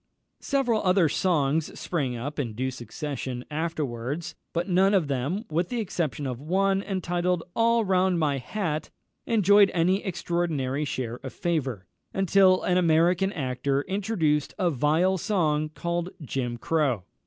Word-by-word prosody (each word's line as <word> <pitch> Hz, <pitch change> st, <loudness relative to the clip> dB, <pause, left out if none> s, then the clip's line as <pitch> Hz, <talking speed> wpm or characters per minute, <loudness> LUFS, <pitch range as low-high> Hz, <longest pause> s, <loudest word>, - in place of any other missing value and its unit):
Several 255 Hz, -6 st, +1 dB
other 185 Hz, -3 st, +4 dB
songs 155 Hz, -2 st, 0 dB
sprang 140 Hz, -8 st, -2 dB
up 145 Hz, +6 st, -5 dB
in 120 Hz, -6 st, -2 dB
due 130 Hz, +3 st, -1 dB
succession, 125 Hz, +1 st, -5 dB
afterwards, 155 Hz, 0 st, -3 dB, 0.2 s
but 170 Hz, +2 st, -2 dB
none 190 Hz, +2 st, +4 dB
of 175 Hz, -6 st, +2 dB
them, 140 Hz, -, -2 dB
with 170 Hz, +3 st, 0 dB
the 245 Hz, -, -2 dB
exception 170 Hz, -, -2 dB
of 125 Hz, -1 st, -4 dB
one, 195 Hz, +5 st, +1 dB
entitled 180 Hz, -3 st, -1 dB
"All 230 Hz, 0 st, +3 dB
round 185 Hz, -1 st, +2 dB
my 145 Hz, -4 st, +1 dB
Hat," 155 Hz, -, -3 dB, 0.4 s
enjoyed 205 Hz, -2 st, +5 dB
any 180 Hz, +4 st, +2 dB
extraordinary 160 Hz, -7 st, -1 dB
share 125 Hz, -4 st, -3 dB
of 130 Hz, -1 st, -8 dB
favour, 135 Hz, -, -2 dB, 0.3 s
until 190 Hz, 0 st, +4 dB
an 180 Hz, 0 st, +2 dB
American 175 Hz, +3 st, +3 dB
actor 135 Hz, -1 st, -1 dB
introduced 185 Hz, -7 st, 0 dB
a 180 Hz, -4 st, +1 dB
vile 160 Hz, +7 st, +2 dB
song 155 Hz, -7 st, +1 dB
called 170 Hz, +2 st, -3 dB
"Jim 125 Hz, -3 st, -3 dB
Crow." 135 Hz, -, 0 dB
165 Hz, 140 wpm, -26 LUFS, 140-185 Hz, 0.4 s, enjoyed